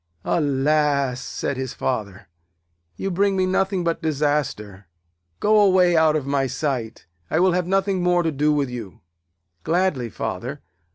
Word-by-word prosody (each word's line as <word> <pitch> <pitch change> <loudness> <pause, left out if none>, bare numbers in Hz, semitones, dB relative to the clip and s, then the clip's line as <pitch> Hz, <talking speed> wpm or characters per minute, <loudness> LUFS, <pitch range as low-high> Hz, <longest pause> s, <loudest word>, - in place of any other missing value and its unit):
'Alas!' 140 -3 +1
said 140 - -4
his 130 -1 -4
Father, 105 -7 -3 0.7
'you 195 - -3
bring 195 +2 +1
me 185 - +2
nothing 190 0 0
but 170 0 -1
disaster. 145 - -2 0.5
Go 215 0 +4
away 185 -3 +4
out 160 -1 +4
of 150 -4 -1
my 140 -1 0
sight. 125 -5 -3 0.2
I 160 - +1
will 185 +1 +4
have 180 0 0
nothing 195 0 +1
more 175 0 +2
to 165 - 0
do 150 +1 +1
with 145 -2 +1
you.' 115 -6 -8 0.6
'Gladly, 165 -8 0
Father. 115 +7 -5
150 Hz, 150 wpm, -22 LUFS, 130-180 Hz, 0.7 s, Go